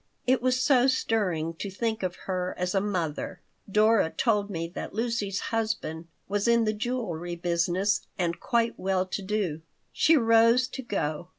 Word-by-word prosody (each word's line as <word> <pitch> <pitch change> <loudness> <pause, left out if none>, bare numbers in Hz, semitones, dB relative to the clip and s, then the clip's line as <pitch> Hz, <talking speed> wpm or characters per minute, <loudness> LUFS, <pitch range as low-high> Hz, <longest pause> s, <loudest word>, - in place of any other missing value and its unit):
It 255 0 +3
was 255 0 +2
so 255 -1 +4
stirring 185 -11 0
to 200 - -3
think 220 +3 -2
of 185 -2 -2
her 185 -1 -2
as 180 0 -1
a 195 - +2
mother. 180 -7 -3 0.3
Dora 215 -3 +4
told 210 0 +1
me 165 -4 -3
that 180 - -7
Lucy's 220 -4 -1
husband 215 -8 -2 0.2
was 205 +2 0
in 235 0 +4
the 215 - +1
jewelry 210 -7 -3
business 175 +4 0
and 170 -2 -1
quite 235 -1 0
well 190 -1 0
to 190 +2 -4
do 190 -6 -2 0.3
She 325 0 +4
rose 230 +1 +4
to 265 - -6
go. 175 - -3
205 Hz, 165 wpm, -27 LUFS, 180-230 Hz, 0.3 s, so